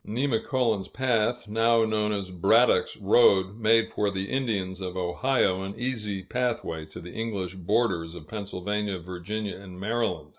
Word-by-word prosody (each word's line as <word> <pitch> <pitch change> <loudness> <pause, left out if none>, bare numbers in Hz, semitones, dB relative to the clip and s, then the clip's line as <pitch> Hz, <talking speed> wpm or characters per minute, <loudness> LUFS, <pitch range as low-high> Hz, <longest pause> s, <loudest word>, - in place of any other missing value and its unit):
Nemacolin's 115 -3 0
Path, 120 -2 0
now 115 +1 +3
known 105 -1 0
as 100 -3 -3
Braddock's 105 +7 +3
Road, 100 -2 +4
made 115 0 +3
for 105 - +1
the 95 0 -4
Indians 100 -8 -1
of 90 -1 -4
the - - -2
Ohio 95 +1 +1
an 95 +1 -5
easy 105 -6 -2
pathway 115 -9 -2
to 80 - -10
the 90 - -10
English 100 -5 -3
borders 95 -3 0
of 80 -3 -10
Pennsylvania, 105 -1 -3
Virginia, 90 +4 -5
and 95 -2 -11
Maryland. 110 -7 -1
105 Hz, 150 wpm, -27 LUFS, 95-115 Hz, -, Road